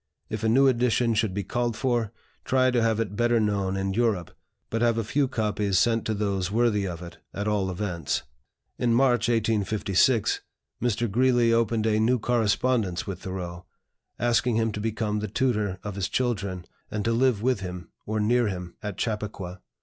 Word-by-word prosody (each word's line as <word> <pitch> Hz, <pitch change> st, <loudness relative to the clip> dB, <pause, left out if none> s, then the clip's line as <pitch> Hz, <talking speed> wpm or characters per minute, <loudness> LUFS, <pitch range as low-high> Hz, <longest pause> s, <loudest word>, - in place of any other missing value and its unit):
If 110 Hz, 0 st, -3 dB
a 110 Hz, -, +3 dB
new 135 Hz, +5 st, +5 dB
edition 120 Hz, -2 st, +2 dB
should 110 Hz, -2 st, +1 dB
be 100 Hz, +2 st, -3 dB
called 120 Hz, +3 st, -1 dB
for, 120 Hz, -5 st, 0 dB, 0.3 s
try 130 Hz, -1 st, +3 dB
to 120 Hz, -1 st, +2 dB
have 115 Hz, -1 st, +2 dB
it 105 Hz, -3 st, -2 dB
better 120 Hz, +1 st, +2 dB
known 100 Hz, -3 st, 0 dB
in 95 Hz, 0 st, -1 dB
Europe, 105 Hz, -6 st, 0 dB, 0.4 s
but 115 Hz, -, -1 dB
have 120 Hz, -1 st, +3 dB
a 115 Hz, -, 0 dB
few 135 Hz, +6 st, +1 dB
copies 105 Hz, -5 st, 0 dB
sent 115 Hz, +1 st, +2 dB
to 110 Hz, -, -1 dB
those 100 Hz, -3 st, -1 dB
worthy 105 Hz, -2 st, +1 dB
of 90 Hz, -1 st, -6 dB
it, 85 Hz, -, -11 dB, 0.2 s
at 100 Hz, +1 st, -2 dB
all 100 Hz, -3 st, +1 dB
events." 90 Hz, -5 st, -2 dB, 0.6 s
In 120 Hz, -1 st, +2 dB
March, 120 Hz, -2 st, +3 dB
1856, 110 Hz, 0 st, +2 dB, 0.4 s
Mr. 120 Hz, -2 st, 0 dB
Greeley 120 Hz, 0 st, +3 dB
opened 115 Hz, -1 st, +1 dB
a 110 Hz, -1 st, +2 dB
new 120 Hz, +3 st, +3 dB
correspondence 115 Hz, -4 st, +1 dB
with 95 Hz, -3 st, -5 dB
Thoreau, 90 Hz, -2 st, -6 dB, 0.5 s
asking 120 Hz, 0 st, +2 dB
him 115 Hz, 0 st, +1 dB
to 105 Hz, -, -5 dB
become 105 Hz, -1 st, -1 dB
the 105 Hz, -, -3 dB
tutor 105 Hz, -4 st, 0 dB
of 105 Hz, -, -4 dB
his 95 Hz, 0 st, -2 dB
children, 100 Hz, -8 st, -1 dB, 0.2 s
and 105 Hz, -1 st, -3 dB
to 115 Hz, -, +2 dB
live 120 Hz, -3 st, +2 dB
with 125 Hz, -3 st, +2 dB
him, 90 Hz, -3 st, -7 dB, 0.2 s
or 110 Hz, +1 st, -1 dB
near 120 Hz, +2 st, +2 dB
him, 90 Hz, -3 st, -5 dB
at 105 Hz, -3 st, -5 dB
Chappaqua. 100 Hz, -5 st, -4 dB
110 Hz, 180 wpm, -26 LUFS, 100-120 Hz, 0.6 s, new